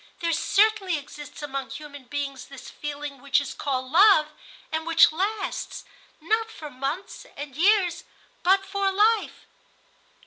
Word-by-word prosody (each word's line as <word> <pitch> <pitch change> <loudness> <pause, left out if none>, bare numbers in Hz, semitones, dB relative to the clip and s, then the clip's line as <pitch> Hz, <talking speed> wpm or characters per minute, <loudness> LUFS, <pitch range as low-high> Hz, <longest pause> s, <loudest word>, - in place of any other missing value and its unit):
There 335 -1 0
certainly 400 0 +2
exists 295 0 -10
among 275 -2 -4
human 285 -3 -9
beings 275 -1 -4
this 275 -2 -11
feeling 290 -2 -6
which 280 0 +2
is 285 - -5
called 260 -2 -3
love, 345 -3 +6 0.4
and 320 +1 -3
which 330 0 +6
lasts, 400 +6 -3 0.3
not 440 +8 0
for 305 -9 -9
months 275 +9 -5
and 285 -2 -7
years, 360 0 +3 0.4
but 385 +2 +3
for 390 0 0
life." 425 +3 +1
315 Hz, 135 wpm, -25 LUFS, 285-390 Hz, 0.4 s, love